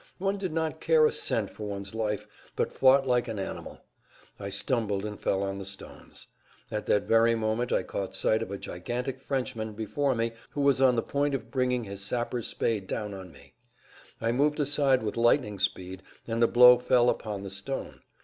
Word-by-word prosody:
One 195 +1 -1
did 185 -3 -3
not 160 -1 -2
care 160 -1 +5
a - - +3
cent 105 -3 -1
for 105 - -7
one's 100 0 -6
life, 105 -2 -2 0.3
but - - -1
fought 135 +1 +5
like 125 -1 +1
an 110 -2 -4
animal. 95 - -6 0.6
I 100 -1 -5
stumbled 100 -1 -1
and 105 -1 -6
fell 95 0 0
on 100 0 -3
the - - -5
stones. 95 0 -9 0.5
At 105 -1 -3
that 105 - +3
very 115 +1 +4
moment 110 +2 -1
I - - +2
caught 100 -1 -4
sight 110 +1 +2
of 115 - -4
a 100 - -4
gigantic 125 +10 -4
Frenchman 130 -5 -3
before 130 +6 -1
me 115 0 0 0.2
who 145 - -4
was 140 -1 +3
on 130 -2 +5
the 115 - 0
point 145 0 0
of - - -6
bringing 125 -2 0
his 100 -2 -7
sapper's 120 +3 -2
spade 105 -5 -1
down 105 -2 -3
on 95 -2 -9
me. 70 - -18 0.7
I 115 0 0
moved 145 +5 +1
aside 140 -3 +2
with 105 - -3
lightning 115 -3 +2
speed, 95 +1 -2 0.2
and 115 0 -2
the 115 - +6
blow 125 +1 +8
fell 125 -1 +3
upon 105 -4 -1
the 100 - -6
stone. 100 +8 -4
115 Hz, 195 wpm, -28 LUFS, 100-130 Hz, 0.7 s, blow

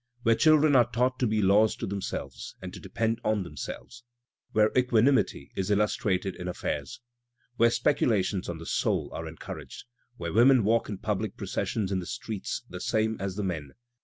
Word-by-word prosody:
Where 115 - +5
children 155 +2 +5
are 120 -2 +5
taught 125 +2 0
to 125 - +2
be 110 -1 +1
laws 105 +3 +4
to - - -4
themselves, 70 -10 -5
and - - -8
to - - -8
depend 115 0 -2
on 105 -2 +1
themselves, 90 - -8 0.5
Where 110 0 +3
equanimity 125 - +2
is 95 +1 -2
illustrated 100 -2 +1
in 90 - -6
affairs. 90 - -4 0.6
Where 115 +1 +5
speculations 110 -6 +1
on 85 - -4
the 80 - -9
soul - - 0
are - - -5
encouraged. - - -9 0.3
Where 85 -1 -4
women 120 +2 +6
walk 115 +3 +2
in 100 - -4
public 105 0 -3
processions 100 -4 -2
in 95 - 0
the 90 - -6
streets 105 +1 -4
the - - -8
same 110 0 +1
as 95 -1 -3
the 105 - -2
men. 80 -7 -4
105 Hz, 175 wpm, -28 LUFS, 95-115 Hz, 0.6 s, women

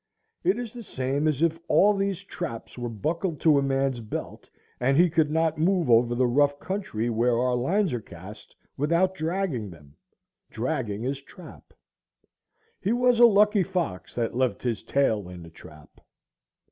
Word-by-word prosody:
It 370 - +2
is 240 -3 -6
the 240 - -8
same 140 - -2
as 155 0 0
if 165 0 +1
all 205 +5 +5
these 195 -1 -2
traps 175 -11 -7
were 120 -1 -4
buckled 155 - -3
to 150 -3 +5
a - - 0
man's 135 -2 0
belt, 110 -2 -7 0.3
and 135 +3 +2
he 175 0 +5
could 160 -2 +2
not 160 0 0
move 170 -5 +2
over 120 +1 +4
the 130 +1 +2
rough 145 +3 +2
country 185 - -3
where 115 +1 +1
our 125 +1 +1
lines 170 +7 0
are 120 - -2
cast 95 +4 -12 0.2
without 170 +6 +2
dragging 160 - -2
them,—dragging 100 - -7
his 135 +2 -3
trap. 170 +4 -14 1.1
He 210 - 0
was 245 -1 +3
a 240 - +9
lucky 210 -1 +4
fox 175 - -3
that 115 -1 -2
left 130 0 0
his 120 -5 -2
tail 110 -9 0
in 90 -1 -10
the 80 - -13
trap. 75 -1 -16
140 Hz, 165 wpm, -26 LUFS, 120-180 Hz, 1.1 s, a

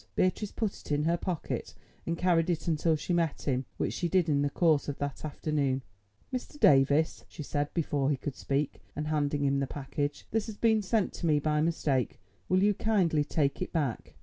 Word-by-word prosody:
Beatrice 195 +3 +1
put 220 -4 -2
it - - -10
in 145 0 +2
her 165 +2 +2
pocket 175 -2 -4 0.3
and 165 0 -1
carried 175 -1 +2
it 165 -2 -1
until 160 0 +2
she 155 +4 -2
met 165 -3 0
him, 130 -2 0
which - - -1
she 175 - -1
did 180 -2 +2
in 140 -1 +3
the 145 - +1
course 155 -2 +2
of 140 - -4
that 145 -1 -4
afternoon. 145 -3 -1 0.5
"Mr. 255 +3 -5
Davies," 140 - +4
she 150 - -8
said 145 0 -2
before 145 -4 +1
he 145 - +1
could 140 0 -5
speak, 140 +1 -2
and 150 +1 -3
handing 145 -1 0
him 140 0 +2
the 135 - -1
package, 145 +2 -3
"this 220 0 0
has 215 -2 -7
been 220 -2 +3
sent 210 0 0
to 170 - -3
me 150 -2 +4
by 150 +1 +1
mistake. 145 -7 0 0.3
Will 185 +1 +3
you 205 0 +4
kindly 185 -8 +2
take 145 0 0
it 185 - -3
back?" 145 -8 -2
155 Hz, 205 wpm, -30 LUFS, 145-175 Hz, 0.5 s, Davies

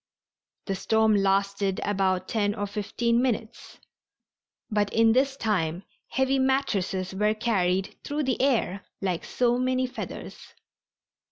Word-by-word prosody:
The 195 - -1
storm 220 +2 +2
lasted 195 0 +1
about 190 -2 0
ten 205 -2 0
or 205 - -2
fifteen 220 +4 0
minutes, 235 -2 -3 0.9
but 205 -1 +1
in 225 0 +4
this 270 +2 +2
time 180 -6 -1 0.2
heavy 265 0 +1
mattresses 200 -9 0
were 210 +2 +1
carried 190 -5 0
through 295 +1 -2
the 260 -2 0
air 230 -7 +1 0.2
like 185 -3 -2
so 245 0 +1
many 255 0 +1
feathers. 250 - -8
215 Hz, 120 wpm, -26 LUFS, 195-250 Hz, 0.9 s, in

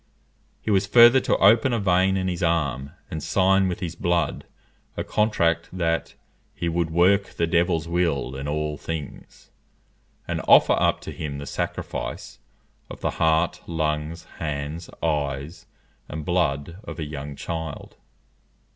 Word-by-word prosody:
He 110 - -1
was 100 0 +2
further 120 +2 +8
to - - +1
open 115 +5 +5
a 115 - +1
vein 95 0 +2
in 95 -1 -1
his 90 -1 -3
arm, 70 -6 0 0.2
and 80 - -4
sign 95 +2 +3
with 90 +2 -4
his 85 -3 -3
blood 85 -1 0 0.5
a - - -1
contract 85 -6 +1
that 85 -2 -1 0.4
"he 85 - -3
would 85 0 0
work 95 +4 +4
the 85 - +1
devil's 85 -1 +1
will 85 -6 0
in 70 +1 -5
all 75 0 -2
things," 80 -4 -8 0.8
and - - -2
offer - - +7
up - - +1
to - - -7
him 70 -3 -5
a 70 - -6
sacrifice - - -5 0.5
of - - -10
the - - 0
heart, 80 +1 +2
lungs, 80 0 -2 0.2
hands, 75 +2 -4
eyes, 75 +1 -2 0.4
and 75 0 -6
blood 85 -2 0
of - - -8
a 80 - -3
young 75 -1 -6
child. 80 -1 -6
85 Hz, 145 wpm, -24 LUFS, 75-90 Hz, 0.8 s, further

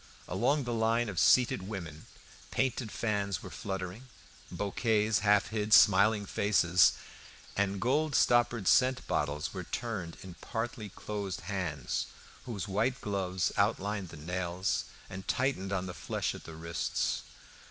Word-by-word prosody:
Along 125 - +1
the 120 -1 -3
line 115 +1 +1
of 90 -5 -2
seated 125 -6 +4
women 85 -7 -7 0.4
painted 130 -3 -1
fans 100 -4 -1
were - - -8
fluttering, 95 +4 -5 0.4
bouquets 105 +1 +1
half 105 0 +3
hid 110 -1 0
smiling 105 +2 +5
faces, 90 -3 +4 0.6
and 100 0 0
gold 145 +6 +1
stoppered 120 -4 +3
scent 130 0 +4
bottles 75 0 -1
were - - -4
turned 95 -8 -4
in 95 -2 -9
partly 115 -2 -4
closed 100 -1 -5
hands, 90 -9 -3 0.4
whose 105 -5 -4
white 110 +6 0
gloves 95 -3 -1
outlined 100 -2 0
the 85 - -10
nails 90 +3 -2 0.2
and 95 +1 -8
tightened 125 -7 0
on 95 -1 -1
the 90 - -5
flesh - - -2
at - - -10
the 80 - -9
wrists. 85 +1 -2
100 Hz, 135 wpm, -31 LUFS, 95-115 Hz, 0.6 s, smiling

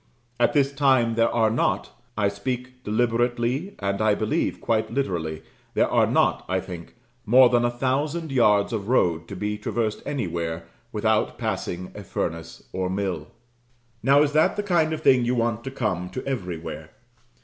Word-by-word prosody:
At 120 - +3
this 140 -1 +2
time 130 -5 +3
there 115 0 +3
are 110 -2 +2
not, 115 - 0 0.3
I 105 -1 +2
speak 125 +5 -4
deliberately, 120 - 0
and 100 +1 -2
I 110 -1 +3
believe 110 0 -1
quite 110 -1 0
literally, 85 - -2 0.3
there - - +3
are - - +3
not, - - +2
I 95 0 +1
think, 90 0 -9 0.3
more 125 +3 +6
than 120 -1 +3
a 120 - +3
thousand 140 +6 -1
yards 105 -5 +3
of 105 -3 -3
road 85 -9 +2
to 100 - -7
be 105 +2 -3
traversed 110 0 -2
anywhere, 85 - -3 0.3
without 110 0 +1
passing 90 +1 -3
a 105 - -8
furnace 85 -2 -4
or 95 -1 -1
mill. 95 -5 -2 0.7
Now, 140 +5 +5
is 145 - 0
that 155 +1 +3
the 205 - -2
kind 170 -5 +2
of 160 - -3
thing 125 -2 +5
you 120 +1 +1
want 115 -1 0
to - - -3
come 95 -9 -2
to 130 - -6
everywhere? 90 -11 -5
115 Hz, 170 wpm, -24 LUFS, 100-130 Hz, 0.7 s, more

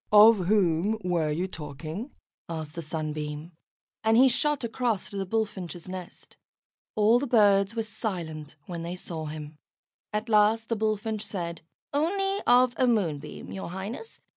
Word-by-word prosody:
"Of 210 -3 +7
whom 195 0 +3
were 170 -4 +1
you 170 +5 -1
talking?" 160 - -6 0.4
asked 160 -2 -5
the 170 - -5
Sunbeam; 155 0 -4 0.5
and 220 +1 +4
he 260 +2 +8
shot 295 +2 +1
across 235 -3 -1
to - - -8
the 195 -1 -2
Bullfinch's 190 -5 -3
nest. 185 -1 -9 0.6
All 215 +3 +5
the 280 - -2
birds 205 -2 +4
were 225 - 0
silent 165 -9 -5
when 170 -2 -5
they 170 +2 -4
saw 165 -3 -6
him. 150 0 -7 0.5
At 210 +2 -2
last 220 +1 +4
the 230 - +1
Bullfinch 215 0 -1
said, 170 -5 -4 0.3
"Only 390 +7 +1
of 250 0 +6
a 255 - +3
Moonbeam, 180 -12 -1
your 190 -3 -5
Highness. 205 - -6
195 Hz, 150 wpm, -27 LUFS, 165-225 Hz, 0.6 s, he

